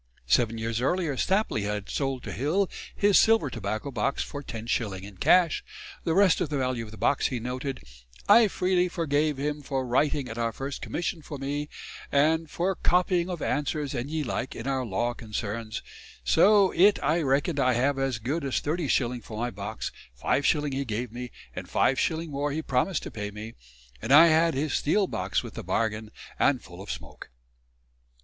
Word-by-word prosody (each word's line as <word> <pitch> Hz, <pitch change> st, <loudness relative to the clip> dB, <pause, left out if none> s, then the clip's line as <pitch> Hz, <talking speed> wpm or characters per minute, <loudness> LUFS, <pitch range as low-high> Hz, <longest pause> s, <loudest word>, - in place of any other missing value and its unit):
Seven 115 Hz, -, +2 dB
years 115 Hz, +1 st, -2 dB
earlier 165 Hz, +1 st, 0 dB
Stapley 190 Hz, -, +1 dB
had 105 Hz, 0 st, -3 dB
sold 135 Hz, -3 st, -2 dB
to -, -, -6 dB
Hill 170 Hz, +9 st, +1 dB, 0.3 s
his 205 Hz, -1 st, +5 dB
silver 220 Hz, -, +4 dB
tobacco 110 Hz, +4 st, -4 dB
box 120 Hz, +3 st, -1 dB
for 145 Hz, -, -7 dB
10s. 115 Hz, -5 st, -3 dB
in 100 Hz, 0 st, -11 dB
cash 175 Hz, -, +4 dB, 0.4 s
the 165 Hz, -2 st, +1 dB
rest 190 Hz, -2 st, +4 dB
of 170 Hz, -, 0 dB
the 150 Hz, -, -1 dB
value 130 Hz, -3 st, -1 dB
of 110 Hz, -, -10 dB
the 110 Hz, -, -11 dB
box, 120 Hz, +7 st, +2 dB
he 125 Hz, -, -3 dB
noted, 130 Hz, +3 st, -4 dB, 0.5 s
"I 230 Hz, -1 st, +7 dB
freely 180 Hz, -1 st, +1 dB
forgave 155 Hz, -4 st, 0 dB
him 145 Hz, +2 st, -2 dB
for 135 Hz, -2 st, -2 dB
writing 135 Hz, +2 st, +1 dB
at 115 Hz, -1 st, -6 dB
our 115 Hz, -1 st, 0 dB
first 135 Hz, +4 st, -5 dB
commission 170 Hz, -1 st, -3 dB
for 145 Hz, -1 st, -7 dB
me, 145 Hz, +2 st, -3 dB, 0.4 s
and 160 Hz, +3 st, +2 dB
for 180 Hz, +5 st, 0 dB
copying 180 Hz, 0 st, +1 dB
of 175 Hz, -3 st, -4 dB
answers 145 Hz, -1 st, -1 dB
and 125 Hz, +1 st, -3 dB
ye 155 Hz, 0 st, -1 dB
like 125 Hz, -1 st, -3 dB
in 115 Hz, -, -7 dB
our 135 Hz, -1 st, 0 dB
law 120 Hz, +2 st, -1 dB
concerns; 110 Hz, -1 st, -5 dB, 0.4 s
so 195 Hz, -, +5 dB
yt 200 Hz, +3 st, +5 dB
I 155 Hz, +4 st, +2 dB
reckon 140 Hz, +2 st, +1 dB
I 130 Hz, -1 st, +3 dB
have 135 Hz, +3 st, +1 dB
as 135 Hz, -2 st, 0 dB
good 140 Hz, +8 st, -2 dB
as 135 Hz, -2 st, 0 dB
30s. 140 Hz, -6 st, 0 dB
for 110 Hz, -, -8 dB
my 120 Hz, +2 st, -2 dB
box: 100 Hz, +2 st, -5 dB, 0.3 s
5s. 145 Hz, -, +1 dB
he 135 Hz, +1 st, -1 dB
gave 115 Hz, -1 st, -3 dB
me, 125 Hz, +1 st, -6 dB, 0.3 s
and -, -, -6 dB
5s. 160 Hz, +5 st, +1 dB
more 145 Hz, 0 st, -2 dB
he 160 Hz, +2 st, -3 dB
promised 155 Hz, +7 st, 0 dB
to -, -, -7 dB
pay 105 Hz, -1 st, -4 dB
me... 105 Hz, +2 st, -8 dB, 0.5 s
and 125 Hz, -, -3 dB
I 165 Hz, +4 st, +9 dB
had 160 Hz, 0 st, +3 dB
his 145 Hz, +1 st, -1 dB
steel 195 Hz, +7 st, +2 dB
box 95 Hz, -, -2 dB
with -, -, -8 dB
the -, -, -6 dB
bargain, 110 Hz, -1 st, -1 dB, 0.3 s
and 135 Hz, -3 st, +3 dB
full 90 Hz, -3 st, -12 dB
of 100 Hz, -, -10 dB
smoake." -, -, -7 dB
135 Hz, 185 wpm, -27 LUFS, 115-160 Hz, 0.5 s, I